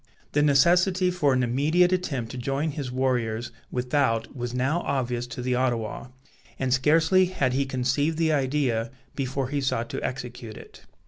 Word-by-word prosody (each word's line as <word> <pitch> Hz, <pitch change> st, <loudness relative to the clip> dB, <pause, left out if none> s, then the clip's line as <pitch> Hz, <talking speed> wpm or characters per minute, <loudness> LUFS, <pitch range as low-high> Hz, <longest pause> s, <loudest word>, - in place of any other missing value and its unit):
The 145 Hz, -, +2 dB
necessity 175 Hz, +6 st, +4 dB
for 155 Hz, -6 st, +2 dB
an 130 Hz, -1 st, +2 dB
immediate 155 Hz, +9 st, +2 dB
attempt 140 Hz, -11 st, -2 dB
to -, -, -7 dB
join 135 Hz, +5 st, -1 dB
his 140 Hz, -3 st, -5 dB
warriors 120 Hz, -3 st, -1 dB, 0.2 s
without 125 Hz, -2 st, 0 dB
was 120 Hz, -2 st, -4 dB
now 130 Hz, +7 st, 0 dB
obvious 125 Hz, -3 st, -2 dB
to 125 Hz, 0 st, -6 dB
the 125 Hz, 0 st, 0 dB
Ottawa; 120 Hz, -3 st, -1 dB, 0.5 s
and 130 Hz, -1 st, 0 dB
scarcely 160 Hz, +7 st, +4 dB
had 140 Hz, -8 st, 0 dB
he 135 Hz, +1 st, 0 dB
conceived 135 Hz, +5 st, 0 dB
the 160 Hz, -1 st, +2 dB
idea 130 Hz, -5 st, 0 dB, 0.3 s
before 135 Hz, -1 st, -2 dB
he 145 Hz, 0 st, -1 dB
sought 130 Hz, -3 st, -1 dB
to -, -, -4 dB
execute 125 Hz, -3 st, -5 dB
it. -, -, -14 dB
130 Hz, 160 wpm, -26 LUFS, 125-150 Hz, 0.5 s, necessity